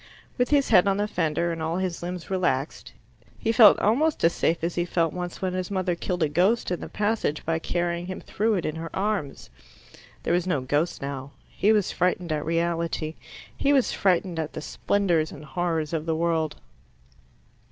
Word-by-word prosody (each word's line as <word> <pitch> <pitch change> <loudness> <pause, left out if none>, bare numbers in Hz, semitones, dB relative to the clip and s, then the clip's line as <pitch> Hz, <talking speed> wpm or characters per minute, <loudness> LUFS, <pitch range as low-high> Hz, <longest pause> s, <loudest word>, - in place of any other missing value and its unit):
With 245 -1 +1
his 285 -2 +3
head 190 -3 +6
on 195 0 +2
the 205 +1 0
fender 170 -3 0
and 165 -1 -4
all 160 +2 -1
his 185 -2 -2
limbs 180 +1 -6
relaxed, 170 -7 -1 0.5
he 225 - 0
felt 220 -2 +8
almost 285 +10 +1
as 165 - +4
safe 165 0 0
as 170 +1 0
he 175 - 0
felt 170 -2 0
once 180 +1 -5
when 185 -1 0
his 185 -1 -3
mother 185 -2 0
killed 175 0 -2
a - - +3
ghost 185 +9 +1
in 180 - -1
the - - -6
passage 210 -8 -1
by 165 0 0
carrying 175 +1 -2
him 185 - -5
through 215 +1 0
it 180 - -2
in 155 +1 -3
her 165 0 -5
arms. 195 -8 -2 0.7
There - - 0
was 175 +1 +1
no 150 -7 +1
ghost 145 +5 -1
now; 140 0 -5
he 210 - +1
was 210 -3 +2
frightened 180 -1 0
at 150 -1 -1
reality; 165 -1 -1 0.4
he 280 - +1
was 270 -3 +3
frightened 180 -2 +1
at 155 -1 -3
the - - -5
splendours 170 -2 0
and 150 +1 -10
horrors 165 -2 -2
of 160 0 -2
the 160 - +1
world. 160 -2 0
175 Hz, 195 wpm, -25 LUFS, 160-190 Hz, 0.7 s, felt